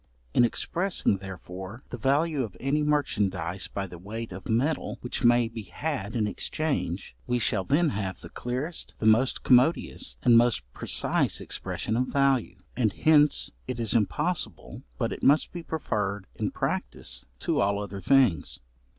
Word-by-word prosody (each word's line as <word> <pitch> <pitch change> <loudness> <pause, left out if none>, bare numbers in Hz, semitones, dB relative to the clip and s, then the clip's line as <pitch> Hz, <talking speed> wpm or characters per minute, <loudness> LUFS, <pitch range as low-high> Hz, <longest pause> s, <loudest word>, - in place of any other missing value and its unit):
In - - +5
expressing, 170 - +1
therefore, 95 +3 -8
the 120 - -4
value 145 +4 +2
of 110 -7 -5
any 140 +3 +1
merchandize 100 - 0
by 100 - -4
the 90 -2 -10
weight 110 +4 -6
of 90 +1 -8
metal 135 +8 0
which 125 - -3
may 120 0 +5
be 115 0 -7
had 125 -1 -4
in 110 -3 +1
exchange, 105 - -2
we 125 0 +1
shall 105 -4 +1
then 155 - +2
have 100 -4 -3
the 85 - -9
clearest, 130 +7 -4
the - - -4
most 115 +4 +3
commodious, 130 +7 +3
and 120 -2 +6
most 120 - +2
precise - - +2
expression 110 - -3
of 125 +2 +1
value; 135 -9 +1 0.2
and 110 -5 +1
hence 150 -2 +4 0.2
it 125 -2 -4
is 115 -3 0
impossible 150 - -1 0.2
but - - -1
it - - -8
must 145 +3 +4
be 175 - -6
preferred 105 - -2
in - - -2
practice 60 0 -3
to - - 0
all 100 0 +2
other 100 -1 -6
things. 125 - +3
120 Hz, 160 wpm, -27 LUFS, 100-140 Hz, 0.2 s, and